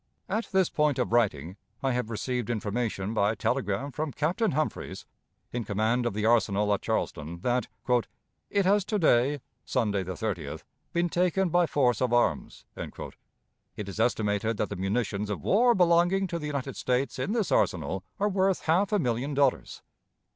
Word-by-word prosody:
At 215 +4 -2
this 190 -3 +3
point 150 -3 +1
of 125 -3 -1
writing 95 -7 +1 0.3
I 135 - +2
have 125 -2 -1
received 120 +1 -2
information, 110 -2 -2
by 105 0 +2
telegram, 125 +4 -1
from 155 +2 -3
Captain 180 - 0
Humphreys, 155 +2 -3 0.5
in 120 -1 -2
command 110 +4 0
of 100 - -3
the 105 0 -1
arsenal 105 -3 +3
at 100 - -1
Charleston, 80 +3 -3
that 125 +3 0 0.8
"it 200 -2 +1
has 200 +1 +4
to 210 - -1
day 140 -4 +3 0.2
(Sunday, 105 -6 0
the 95 0 -4
30th) 100 -5 -4 0.3
been 175 0 +1
taken 180 +2 +1
by 175 +1 +3
force 125 -7 +2
of 125 -2 +1
arms." 120 - 0
It 105 - -10
is 100 +2 -7
estimated 110 -1 +1
that 105 - -1
the 100 - -4
munitions 100 +1 -1
of 105 - -4
war 240 +4 +4
belonging 175 +2 +4
to 170 - -2
the 150 - -4
United 140 -2 -3
States 125 +1 -1
in 205 - -1
this 225 -5 0
arsenal 90 +3 +1 0.2
are 205 - +2
worth 190 -1 +1
half 185 +6 +2
a 210 - +3
million 130 - -1
of - - -4
dollars. 140 -2 +1
125 Hz, 170 wpm, -28 LUFS, 105-170 Hz, 0.8 s, has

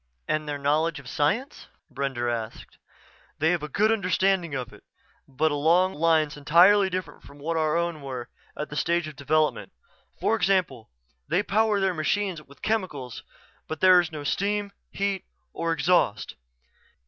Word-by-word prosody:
"And 155 0 -1
their 145 - -2
knowledge 150 +3 0
of 135 - -13
science?" 180 - -1 0.3
Brender 135 -3 -2
asked. 115 -2 -5 0.6
"They 160 +3 +2
have 175 -3 0
a 150 - -5
good 215 +9 +2
understanding 190 -5 +1
of 125 -2 -5
it, - - -16 0.4
but 150 +4 0
along 170 +6 +3
lines 155 -1 +2
entirely 180 +7 +5
different 180 -5 -5
from 145 - -15
what 160 +4 -3
our 155 0 +1
own 170 -3 -2
were 130 -3 -6 0.3
at 150 - -4
their - - -6
stage 170 -1 0
of 155 - -9
development. 155 +2 0 0.5
For 225 - +2
example: 185 - 0 0.4
they 200 - +1
power 215 0 +2
their 190 -1 +1
machines 175 +2 -1
with 140 -2 -19
chemicals 165 - -2 0.5
but 160 - -5
there 185 -1 +7
is 175 -2 -1
no 150 -2 -6
steam, 200 +5 -1 0.2
heat, 195 -1 -2 0.3
or 165 0 -2
exhaust." 165 - +1
160 Hz, 160 wpm, -26 LUFS, 145-190 Hz, 0.6 s, there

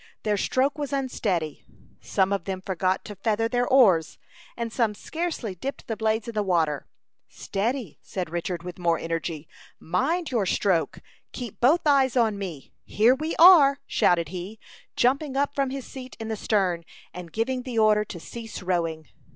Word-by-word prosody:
Their 210 -1 +1
stroke 265 +8 0
was 290 -1 -3
unsteady; 205 - -2 0.4
some 190 +1 +1
of 195 -4 -2
them 190 -1 -3
forgot 185 0 -1
to 210 - -8
feather 220 +3 0
their 245 +1 0
oars, 195 - +4 0.4
and 230 -1 -4
some 225 -4 +1
scarcely 320 - -4
dipped 265 +10 -6
the 225 - -3
blades 220 +1 0
in 235 - -5
the 215 - 0
water. 165 -7 0 0.4
"Steady!" 210 - -3
said 185 -2 -4
Richard, 175 0 -3
with 180 0 -8
more 170 -2 +2
energy. 165 -2 -4 0.3
"Mind 290 - -1
your 220 -6 +1
stroke. 180 -3 0 0.3
Keep 240 -5 -7
both 290 +8 +5
eyes 270 -3 +3
on 220 -4 +2
me. 170 -9 -7
Here 225 +5 +4
we 310 +5 -3
are!" 310 -6 +8
shouted 170 - +2
he, 185 +4 -7 0.4
jumping 270 +2 +1
up 285 +1 +1
from 275 -2 0
his 270 -1 -5
seat 260 -1 -10
in 225 0 -5
the 220 - -1
stern, 190 -5 0 0.3
and 175 -2 -8
giving 250 +5 -1
the 250 -2 -5
order 215 -1 +4
to 185 -4 -8
cease 225 +2 -8
rowing. 165 -3 -1
215 Hz, 170 wpm, -25 LUFS, 180-260 Hz, 0.4 s, are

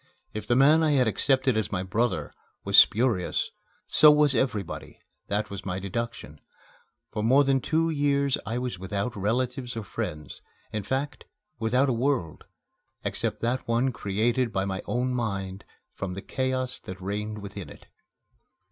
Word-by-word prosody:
If 110 0 -5
the 120 - +3
man 145 +5 +6
I 155 -2 +3
had 130 -4 +4
accepted 130 +3 +2
as 110 -1 -1
my 90 -2 -1
brother 115 +5 -1 0.3
was - - 0
spurious, 110 -6 +4 0.3
so 150 - +7
was 150 -2 +5
everybody 110 -7 -2 0.3
that 105 +1 -1
was 100 - -6
my 90 -1 -3
deduction. 115 +5 -5 0.7
For 105 - -3
more 130 +6 +5
than 135 -1 +2
two 165 +4 +1
years 140 -2 +2
I 115 - -3
was 125 -7 -3
without 100 +5 -3
relatives 125 +4 -1
or 110 - -3
friends, 75 -6 -5 0.3
in 105 - -1
fact, 130 +8 -3 0.3
without 125 +5 +2
a 130 - +2
world, 120 - -1 0.6
except - - -2
that 120 +3 -1
one 120 +3 +2
created 115 +3 0
by 95 -1 0
my 95 -1 -3
own 125 +1 0
mind 100 -5 -3 0.3
from 95 -2 -5
the 100 - -6
chaos 130 -1 -2
that 95 0 -9
reigned 105 +3 -3
within 100 -5 -7
it. - - -14
115 Hz, 155 wpm, -27 LUFS, 100-130 Hz, 0.7 s, so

